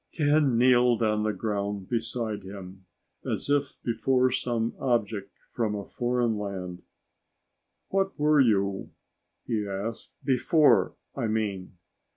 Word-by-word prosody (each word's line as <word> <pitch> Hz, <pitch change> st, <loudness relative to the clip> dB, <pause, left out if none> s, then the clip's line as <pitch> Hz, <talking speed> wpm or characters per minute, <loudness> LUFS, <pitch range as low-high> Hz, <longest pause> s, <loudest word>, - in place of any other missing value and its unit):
Ken 145 Hz, -5 st, +3 dB
kneeled 125 Hz, -1 st, +4 dB
on 105 Hz, -1 st, +2 dB
the 110 Hz, 0 st, +1 dB
ground 100 Hz, -1 st, -3 dB
beside 115 Hz, -2 st, -2 dB
him, 95 Hz, -1 st, -10 dB, 0.4 s
as -, -, -2 dB
if 145 Hz, -1 st, +1 dB
before 130 Hz, +2 st, +2 dB
some 120 Hz, -3 st, -1 dB
strange -, -, -21 dB
object 110 Hz, -6 st, 0 dB, 0.2 s
from 110 Hz, -4 st, -1 dB
a 100 Hz, -1 st, -5 dB
foreign 120 Hz, -3 st, 0 dB
land. 95 Hz, -3 st, -5 dB, 1.1 s
"What 195 Hz, 0 st, 0 dB
were 150 Hz, 0 st, +4 dB
you?" 100 Hz, -6 st, +2 dB, 0.5 s
he 105 Hz, -3 st, -1 dB
asked. 100 Hz, +4 st, -5 dB
"Before, 130 Hz, -, +3 dB, 0.2 s
I 120 Hz, -4 st, -1 dB
mean." 100 Hz, -4 st, -2 dB
115 Hz, 125 wpm, -27 LUFS, 100-125 Hz, 1.1 s, kneeled